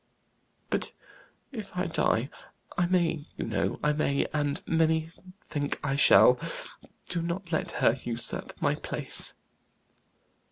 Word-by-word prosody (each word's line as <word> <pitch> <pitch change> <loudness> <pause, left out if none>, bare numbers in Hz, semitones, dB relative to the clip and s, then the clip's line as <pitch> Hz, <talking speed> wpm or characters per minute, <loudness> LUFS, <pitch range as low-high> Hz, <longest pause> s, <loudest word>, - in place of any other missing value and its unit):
"But - - -1 0.6
if 215 -8 -7
I 180 - +1
die? 135 -6 +1 0.4
I 175 - +2
may 170 -4 +1
you - - -2
know - - -1
I 150 - +3
may; 140 -2 +1
and 145 -1 0
many 160 0 +2 0.3
think 145 -2 -3
I 135 -1 0
shall 145 - +7 0.7
do 175 - -1
not 170 +1 -4
let 155 - -1
her 115 - +3
usurp 120 0 -4
my - - +2
place." - - 0
160 Hz, 125 wpm, -29 LUFS, 145-170 Hz, 0.7 s, shall